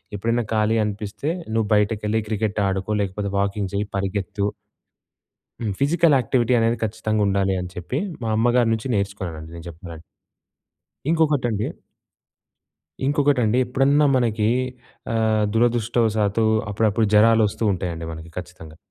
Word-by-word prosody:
ఎప్పుడైనా 115 +4 0
ఖాళీ 110 +1 +2
అనిపిస్తే 105 +5 -4 0.2
నువ్వు 110 -2 +1
బయటకెళ్ళి 105 +1 +1
క్రికెట్ 105 -1 -1
ఆడుకో 95 +2 -2
లేకపోతే 100 +1 -3
వాకింగ్ 100 -1 -1
చెయ్యి, 100 +1 -1
పరిగెత్తు. 100 +1 -2 1.1
హ్మ్. 110 -4 -2
ఫిజికల్ 160 +3 +3
యాక్టివిటీ 125 0 +1
అనేది 115 +1 +2
ఖచ్చితంగా 110 0 -1
ఉండాలని 95 -2 0
చెప్పి, 90 - -3 0.2
మా 115 - -1
అమ్మగారి 120 +1 +3
నుంచి 110 +3 -3
నేర్చుకున్నానండి 95 -6 -4
నేను 85 0 -10
జేప్పాలంటే. 85 -1 -10 1.1
ఇంకొకటండి 145 -10 +1 1.4
ఇంకొకటండి 140 -5 +2
ఎప్పుడన్నా 140 +4 +3
మనకి 110 -3 +1 0.6
ఆహ్, 110 -1 +2
దురదృష్టవశాతు 115 -2 +2 0.3
అప్పుడప్పుడు 110 +1 +1
జరాలొస్తూ 110 0 +4
ఉంటయండి 85 -3 -4
మనకి 80 +1 -10
ఖచ్చితంగా. 90 -3 -9
105 Hz, 110 wpm, -22 LUFS, 100-115 Hz, 1.4 s, జరాలొస్తూ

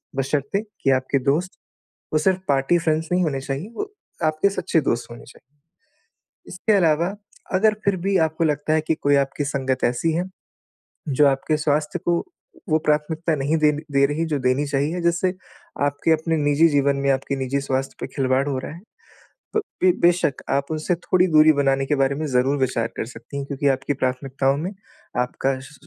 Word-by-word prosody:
बशर्ते 140 +7 -1 0.2
कि 135 - +2
आपके 130 +1 +1
दोस्त, 175 +6 -1 0.6
वो 155 - +3
सिर्फ़ 185 +4 +1
पार्टी 140 +5 +3
फ्रेंड्स 160 -1 0
नहीं 180 0 +3
होने 140 -4 -1
चाहिए, 135 +9 -5
वो 415 0 -5 0.3
आपके 155 +5 +2
सच्चे 185 -4 0
दोस्त 120 -5 -2
होने 115 - -10
चाहिए। - - -16 1.1
इसके 180 +4 -1
अलावा, 170 -1 +2 0.4
अगर 215 +3 +4
फिर 200 -1 +2
भी 195 0 +2
आपको 160 +1 -2
लगता 155 0 0
है 155 - +3
कि 160 - +2
कोई 145 -2 +1
आपकी 140 +1 0
संगत 135 -2 -1
ऐसी 125 +7 +1
है। 175 +3 0 0.8
जो 145 +1 +4
आपके 140 +3 +1
स्वास्थ्य 150 +3 0
को 175 0 +1 0.5
वो 155 - +4
प्राथमिकता 155 +2 +1
नहीं 145 +3 0
देन 150 -1 +3
दे 140 0 +4
रही 150 +3 -1
जो 145 - +1
देनी 130 +3 +1
चाहिए, 145 +5 -1
जिससे 170 +2 +1 0.5
आपके 145 +3 +1
अपने 160 +1 +1
निजी 145 +2 +4
जीवन 140 -1 +2
में, 140 0 0
आपके 135 +1 -1
निजी 135 +1 -1
स्वास्थ्य 135 0 -2
पे - - -4
खिलवाड़ 135 0 +1
हो 135 - -1
रहा - - -7
है। 170 - -11 0.7
प 435 - +4 0.2
बे 185 - +7
बेशक 170 -5 +2
आप 140 0 +1
उनसे 155 +3 0
थोड़ी 180 +1 +2
दूरी 155 -2 +6
बनाने 135 -1 +1
के 145 - +1
बारे 135 0 +1
में 155 +2 -3
ज़रूर 135 +1 +1
विचार 130 -4 0
कर - - -2
सकती 120 +4 -10
हैं, 140 - -3
क्योंकि 140 0 -2
आपकी 135 +1 0
प्राथमिकताओं 135 +1 -1
में 170 +6 -3 0.5
आपका 130 +2 -1
श 130 - -12
145 Hz, 185 wpm, -22 LUFS, 135-165 Hz, 1.1 s, बे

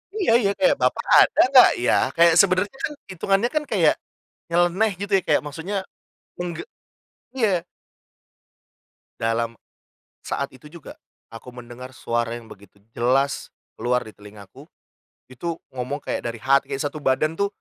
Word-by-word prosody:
Iya 390 - +1
iya, 200 -4 +1
kayak, 280 - +4
"Bapa - - +1 0.2
ada - - +4
enggak 260 -2 +8
ya?". 120 - +3 0.2
Kayak 170 0 +6
sebenarnya 200 +6 0
kan - - -1 0.2
hitungannya 195 +6 0
kan, 305 - +1
kayak - - +4 0.6
nyeleneh, 175 +5 +2
gitu 200 0 -5
ya, - - -1
kayak 150 - +3
maksudnya 165 +7 -6 0.6
mengge 175 - -4 0.7
iya. 200 -8 +1 1.6
Dalam 115 0 -1 0.7
saat 140 -1 -4
itu 150 +3 -15
juga, 170 -3 -11 0.3
aku 115 +2 -11
mendengar 125 +1 -10
suara 120 -3 -2
yang 115 - -14
begitu 100 -1 -16 0.2
jelas 135 +4 0 0.2
keluar 125 -1 -1
di 110 - -12
telingaku, 105 -1 -15 0.6
itu 165 +6 -4 0.2
ngomong 130 +3 -5
kayak - - -3
dari 115 - -4
hati, 135 +1 +3
kayak 135 - -3
1 145 +1 -4
badan 155 +5 0
tuh 200 - +2
145 Hz, 145 wpm, -23 LUFS, 120-185 Hz, 1.6 s, enggak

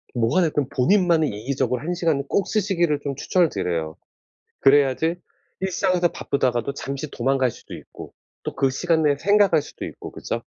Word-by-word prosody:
뭐가 120 +9 +2
됐든 150 -5 0
본인만의 170 +1 +3
이기적으로 125 +3 -2
1 175 +3 -2
시간을 165 -5 0
꼭 200 - +1
쓰시기를 175 -8 +1
좀 140 -1 -3
추천을 170 +4 +2
드려요. 85 -5 -3 0.7
그래야지 145 +4 +3 0.4
일상에서 185 -2 +1
바쁘다가도 130 -2 -1
잠시 140 +2 -5
도망갈 130 +1 +1
수도 - - -12
있고 - - -11 0.3
또 - - -4
그 135 -1 +1
시간 165 +3 +1
내에 145 -2 +3
생각할 200 -5 +4
수도 - - -9
있고 - - -9
그죠? - - -4
145 Hz, 370 characters per minute, -23 LUFS, 130-175 Hz, 0.7 s, 생각할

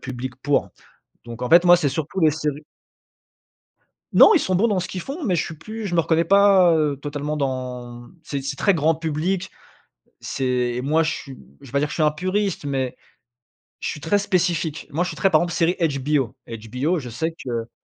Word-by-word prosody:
public 130 -1 -6
pour. 145 -1 +1 0.5
Donc 120 0 -9
en 125 - -2
fait, 170 +1 +7
moi, 175 0 +8
c'est 150 -5 0
surtout 155 +6 -3
les 155 -3 +4
séries 150 -1 -3 1.5
Non, - - +8
ils - - +4
sont 185 - -1
bons 210 +6 +3
dans 200 -4 +1
ce 185 - -5
qu'ils 185 - -5
font, 280 - -6
mais 185 -6 +1
je 165 - 0
suis 170 - -7
plus 220 +6 -7
je 175 - -3
me 170 - +4
reconnais 165 +1 +1
pas, 195 -1 +5
heu, 150 -3 +1
totalement 145 +1 -4
dans 125 -3 -4
c'est 140 -4 -4
c'est 135 +1 -3
très 200 - +3
grand 160 -1 +2
public, 165 +4 -2 0.7
c'est 125 -2 -1
moi, 160 +3 +2
je 155 - 0
suis, 135 -2 -8 0.2
je - - -14
vais 120 - -14
pas 140 - +2
dire 150 +1 0
que - - -13
je - - -5
suis 160 - 0
un 150 - +4
puriste, 185 +3 -2
mais 135 -3 -2 0.9
je - - -2
suis 150 - -5
très 165 +7 +1
spécifique. 175 -5 -1
Moi, 160 +5 0
je 180 - -3
suis - - -8
très 195 - +3
par 155 -4 +4
exemple, 175 0 -2
série 175 0 +1
HBO. 145 -5 0
HBO, 125 +9 -2
je 125 -4 -8
sais 160 +8 -2
que 115 -2 -3
155 Hz, 215 wpm, -22 LUFS, 135-175 Hz, 1.5 s, moi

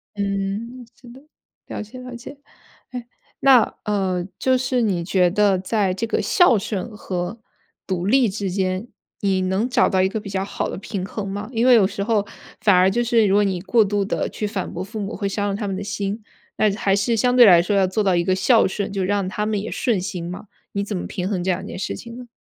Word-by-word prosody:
嗯， 200 +5 -3
是 250 - -16
的， 255 +3 -13 0.5
了 - - -5
解 215 +4 -10
了 250 -1 -8
解。 240 +4 -10 0.5
哎， 245 -2 -7 0.3
那 265 -3 +7 0.2
呃 190 -4 -1
就 260 0 +2
是 255 -1 0
你 190 -6 0
觉 180 -1 +3
得 200 +1 +3
在 195 0 0
这 210 +5 -2
个 230 - -1
孝 350 - +4
顺 205 +2 -4
和 180 +3 -4 0.5
独 185 -2 -2
立 255 +4 +4
之 195 -1 -3
间， 185 +3 -1 0.3
你 195 -2 +1
能 190 +6 0
找 250 0 +3
到 190 -2 +2
一 190 - +2
个 220 - -3
比 205 -1 -9
较 190 0 -2
好 200 - -3
的 - - -5
平 195 -1 -5
衡 210 +1 -5
吗？ 205 +2 -5
因 230 +1 +1
为 255 - +7
有 205 -5 +5
时 200 - -4
候 210 -1 +1 0.3
反 200 -3 +4
而 185 +1 +5
就 240 - 0
是 235 -2 +3
如 195 -1 +3
果 205 - +4
你 185 -3 -1
过 220 +3 +3
度 205 0 0
地 195 - -2
去 215 - -4
反 205 -2 -3
驳 175 - -4
父 215 +3 -7
母 205 +2 -4
会 200 -2 -2
伤 205 +1 -2
了 195 - -1
他 210 - -4
们 195 -1 -2
的 200 - -4
心， 205 +1 -3 0.4
那 215 - +3
还 200 -2 +1
是 205 +4 +1
相 245 +3 +2
对 245 - +9
来 175 -5 +7
说 195 +4 -1
要 195 -1 +3
做 200 +4 -1
到 190 -2 +2
一 170 - +2
个 185 - +2
孝 220 +5 +4
顺， 200 +1 -3
就 195 -1 -2
让 200 -1 0
他 210 +2 -2
们 210 -2 -1
也 215 - -6
顺 225 -7 0
心 180 -3 -5
嘛， 180 +4 -8 0.3
你 200 - -1
怎 200 -1 -4
么 - - -5
平 180 0 -4
衡 190 -4 -1
这 185 +1 0
两 175 - -3
件 - - -7
事 - - -3
情 235 0 -10
呢？ 250 -1 -10
200 Hz, 260 characters per minute, -22 LUFS, 190-225 Hz, 0.5 s, 对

